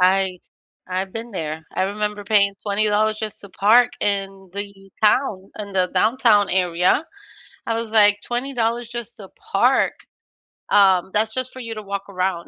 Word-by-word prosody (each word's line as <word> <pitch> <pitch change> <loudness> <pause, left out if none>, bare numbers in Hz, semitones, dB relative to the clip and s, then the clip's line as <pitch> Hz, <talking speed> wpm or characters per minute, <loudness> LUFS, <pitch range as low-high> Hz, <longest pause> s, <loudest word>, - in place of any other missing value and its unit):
I 185 0 +3 0.5
I've 185 +1 -2
been 230 +1 -6
there. 160 -4 -5
I - - 0
remember 210 +1 -2
paying 200 -1 +3
$20 215 +1 +1
just 215 -2 -5
to 200 - -12
park 225 +6 +4
in 195 -2 -2
the 200 -1 -8
town, 210 -5 +2
in 205 -1 -6
the 185 -1 +1
downtown 220 -3 +3
area. 180 - +2 0.6
I 230 0 0
was, 225 -2 -7
like, 205 -2 +5
"$20 240 -2 -2
just 240 -2 -7
to 195 -3 -11 0.2
park?" - - +3 0.8
Um, 190 -3 +4
that's 220 +1 +1
just 255 0 -2
for 260 - -9
you 230 -2 -6
to 215 - -6
walk 200 -1 -4
around. 185 -2 -2
205 Hz, 160 wpm, -21 LUFS, 190-225 Hz, 0.8 s, like